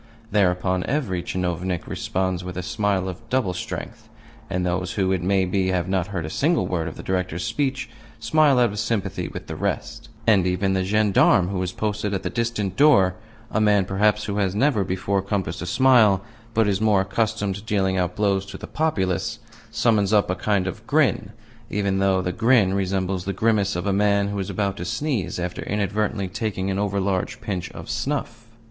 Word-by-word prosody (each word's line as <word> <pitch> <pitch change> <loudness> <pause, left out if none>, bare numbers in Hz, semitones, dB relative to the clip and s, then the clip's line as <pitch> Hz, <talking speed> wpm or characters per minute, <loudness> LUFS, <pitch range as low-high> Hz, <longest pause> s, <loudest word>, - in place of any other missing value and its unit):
Thereupon 90 -2 +2
every 120 -12 -1
tchinovnik 90 0 -2
responds 95 -1 -2
with 90 -1 -6
a 90 - -3
smile 100 -2 0
of 95 +1 -6
double 125 -8 +1
strength, 90 - -6 0.4
and 90 0 -1
those 90 0 -1
who 95 -2 +1
(it 95 -2 0
may 95 +1 +2
be) 95 +1 0
have 90 -1 0
not 95 -2 0
heard 90 -5 -4
a - - -5
single 160 +3 +1
word 85 -2 -2
of 80 - -7
the - - -8
Director's 90 -2 -2
speech 130 +2 -1 0.3
smile 140 +4 +3
out 120 -3 +4
of 105 - -5
sympathy 115 -3 -2
with - - -8
the - - -6
rest, 115 0 -3 0.2
and 100 -5 +4
even 95 +2 +1
the 95 -1 +1
gendarme 100 -2 +3
who 95 -2 -2
is 90 -1 -2
posted 105 -1 -2
at 95 - -3
the 90 - -3
distant 110 -5 -2
door 100 - +5 0.4
a 110 - +1
man, 105 -2 +4
perhaps, 105 +3 +2
who 100 -1 -3
has 100 -2 0
never 120 -2 +2
before 95 +1 -1
compassed 95 -3 -3
a 85 - -4
smile, 110 -3 +4 0.3
but 110 -1 +3
is 100 0 0
more 105 -3 +4
accustomed 100 +1 -1
to 100 - -7
dealing 100 -3 0
out 90 -1 -1
blows 100 -2 +1
to - - -8
the - - -8
populace 95 - -1 0.3
summons 105 -4 +2
up 105 -4 +3
a - - -1
kind 100 0 0
of 110 +5 -6
grin, 140 -8 +2 0.4
even 100 -1 0
though 95 -1 +2
the 90 - -1
grin 110 -3 +3
resembles 95 -1 -1
the 100 - -2
grimace 100 -1 +1
of 90 - -3
a 100 - +1
man 100 0 +2
who 100 0 -3
is 95 - -3
about 100 -2 -1
to 90 - -4
sneeze 100 - -2
after 90 0 -4
inadvertently 105 0 -1
taking 100 -1 -2
an 95 - -1
over 100 -1 0
large 95 -1 -1
pinch 95 -4 -4
of - - -9
snuff. 115 -5 -3
100 Hz, 200 wpm, -23 LUFS, 95-110 Hz, 0.4 s, door